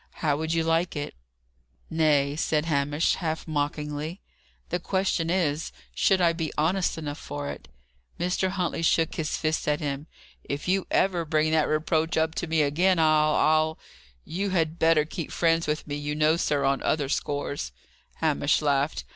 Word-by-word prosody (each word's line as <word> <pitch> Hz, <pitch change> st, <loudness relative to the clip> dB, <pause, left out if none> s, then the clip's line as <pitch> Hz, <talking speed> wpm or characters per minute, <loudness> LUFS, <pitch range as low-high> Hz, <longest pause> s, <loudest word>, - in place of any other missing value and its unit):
How 145 Hz, -2 st, +3 dB
would 160 Hz, +2 st, -3 dB
you 165 Hz, 0 st, +1 dB
like 165 Hz, +2 st, +1 dB
it?" 145 Hz, 0 st, -4 dB, 0.7 s
"Nay," 150 Hz, -3 st, +2 dB
said 155 Hz, 0 st, 0 dB
Hamish, 145 Hz, 0 st, +1 dB
half 160 Hz, -3 st, -3 dB
mockingly: 150 Hz, +2 st, -3 dB, 0.5 s
"the 175 Hz, -, -1 dB
question 185 Hz, -2 st, 0 dB
is, 165 Hz, -4 st, 0 dB, 0.2 s
should 190 Hz, -1 st, +3 dB
I 170 Hz, -2 st, +4 dB
be 165 Hz, -2 st, -3 dB
honest 170 Hz, +3 st, +1 dB
enough 150 Hz, -2 st, -5 dB
for 70 Hz, 0 st, -5 dB
it?" 70 Hz, -, -10 dB, 0.5 s
Mr. 180 Hz, +2 st, 0 dB
Huntley 180 Hz, -3 st, -2 dB
shook 165 Hz, 0 st, +2 dB
his 155 Hz, -2 st, -2 dB
fist 155 Hz, -1 st, -1 dB
at 150 Hz, 0 st, +2 dB
him. 145 Hz, 0 st, -4 dB, 0.4 s
"If 140 Hz, +4 st, -5 dB
you 190 Hz, +1 st, +1 dB
ever 180 Hz, -3 st, +2 dB
bring 155 Hz, 0 st, +1 dB
that 160 Hz, -1 st, +3 dB
reproach 160 Hz, +1 st, 0 dB
up 160 Hz, 0 st, +1 dB
to 175 Hz, -, -4 dB
me 160 Hz, -1 st, +2 dB
again, 175 Hz, +6 st, +2 dB
I'll 155 Hz, -1 st, +4 dB
I'll 155 Hz, +1 st, +2 dB, 0.5 s
You 195 Hz, +4 st, -2 dB
had 165 Hz, -3 st, 0 dB
better 160 Hz, -2 st, +4 dB
keep 160 Hz, 0 st, -6 dB
friends 165 Hz, -1 st, +2 dB
with 150 Hz, +1 st, -1 dB
me, 145 Hz, -1 st, -4 dB
you 145 Hz, 0 st, -3 dB
know, 155 Hz, +1 st, +3 dB
sir, 145 Hz, -4 st, 0 dB
on 135 Hz, 0 st, +1 dB
other 145 Hz, -3 st, 0 dB
scores." 145 Hz, -, -2 dB, 0.4 s
Hamish 150 Hz, -2 st, +1 dB
laughed. 145 Hz, 0 st, 0 dB
155 Hz, 170 wpm, -26 LUFS, 150-165 Hz, 0.7 s, I